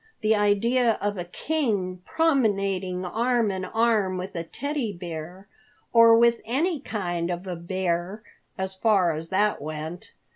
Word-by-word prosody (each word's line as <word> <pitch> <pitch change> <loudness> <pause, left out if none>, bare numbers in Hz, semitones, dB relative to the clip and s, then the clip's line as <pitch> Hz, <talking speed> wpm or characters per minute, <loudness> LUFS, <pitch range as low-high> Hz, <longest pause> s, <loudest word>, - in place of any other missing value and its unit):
The 220 0 +3
idea 225 +4 +3
of 205 -2 -2
a 175 - -3
king 200 - -2
promenading 195 - +1
arm 230 +2 +1
in 190 -1 -3
arm 220 -5 +1
with 185 +1 -6
a 170 - -2
Teddy 270 - -3
Bear, 175 +1 -8 0.5
or 230 -1 +8
with 235 0 +4
any 305 +8 0
kind 175 -9 -3
of 175 +1 -4
a 180 -2 -4
bear, 180 +3 -2 0.3
as 190 0 -3
far 190 -3 +3
as 160 +2 -6
that 205 +2 +1
went! 155 +3 -6
195 Hz, 145 wpm, -25 LUFS, 180-230 Hz, 0.5 s, or